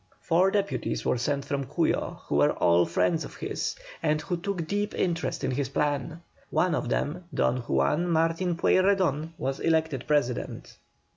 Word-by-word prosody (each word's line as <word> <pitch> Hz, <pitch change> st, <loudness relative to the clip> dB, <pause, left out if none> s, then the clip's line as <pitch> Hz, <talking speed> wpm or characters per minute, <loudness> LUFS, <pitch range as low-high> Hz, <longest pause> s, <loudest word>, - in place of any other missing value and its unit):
Four 180 Hz, +3 st, +3 dB
deputies 200 Hz, 0 st, -1 dB
were 125 Hz, -, +1 dB
sent 140 Hz, +2 st, -1 dB
from 140 Hz, -1 st, -2 dB
Cuyo, -, -, -1 dB
who -, -, 0 dB
were 75 Hz, 0 st, +4 dB
all 85 Hz, 0 st, +3 dB
friends 160 Hz, -, +1 dB
of -, -, -9 dB
his, -, -, -3 dB, 0.3 s
and 155 Hz, -1 st, +1 dB
who 175 Hz, +4 st, -2 dB
took 175 Hz, -1 st, -3 dB
deep 205 Hz, +3 st, -1 dB
interest 170 Hz, -2 st, -1 dB
in -, -, 0 dB
his 135 Hz, -1 st, -1 dB
plan. 150 Hz, +3 st, -1 dB, 0.3 s
One 180 Hz, -2 st, +2 dB
of -, -, -1 dB
them, 170 Hz, +5 st, -2 dB
Don 125 Hz, -, +1 dB
Juan 120 Hz, -, +1 dB
Martin 165 Hz, +1 st, +1 dB
Pueyrredon, 180 Hz, -5 st, +2 dB
was 135 Hz, 0 st, -2 dB
elected 160 Hz, -5 st, +1 dB
President. 145 Hz, -5 st, -1 dB
160 Hz, 160 wpm, -27 LUFS, 135-175 Hz, 0.3 s, were